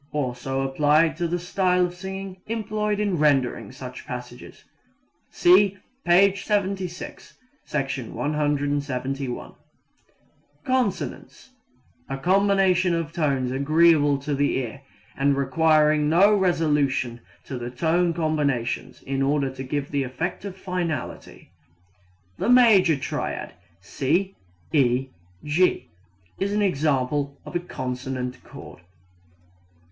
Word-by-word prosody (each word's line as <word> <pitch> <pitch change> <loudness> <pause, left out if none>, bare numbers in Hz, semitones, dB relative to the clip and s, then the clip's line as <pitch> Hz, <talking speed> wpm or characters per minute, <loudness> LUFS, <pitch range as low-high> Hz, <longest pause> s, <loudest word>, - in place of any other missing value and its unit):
Also 135 -1 -2
applied 150 +4 +3
to 170 -1 -1
the 175 +1 -1
style 180 0 +1
of 175 - -5
singing 190 +1 -7
employed 215 -2 -2
in 200 -5 0
rendering 140 -5 +1
such 130 0 -9
passages. 125 0 -8 0.7
(See 195 +2 +4 0.3
p. 190 +3 +5
76, 195 -3 -3 0.3
Sec. 140 -2 -2
171.) 140 -1 -2 1.1
Consonance 255 +1 -2 0.6
A 135 - -3
combination 185 +1 +3
of 165 -1 -3
tones 140 -6 0
agreeable 145 +1 +4
to 140 +2 -4
the 145 +1 +1
ear 130 +1 -5 0.3
and 140 0 +2
requiring 150 +1 +3
no 190 +6 +5
resolution 150 -10 +1 0.2
to 130 - -5
other 120 0 -5
tone 165 +7 +1
combinations 145 -7 -1
in 135 0 -2
order 140 -1 +1
to 130 - -8
give 140 +2 -3
the 140 -1 0
effect 135 +9 -4
of 195 -2 -7
finality. 180 -7 -5 0.9
The - - 0
major 215 -9 +6
triad 135 - -4 0.3
C 170 - -1 0.4
E 130 -2 +2 0.3
G 170 +5 +1 0.5
is 200 +1 -1
an 210 0 +1
example 140 -4 0
of - - -9
a - - +2
consonant 130 -5 -5
chord. - - -12
150 Hz, 110 wpm, -24 LUFS, 135-185 Hz, 1.1 s, major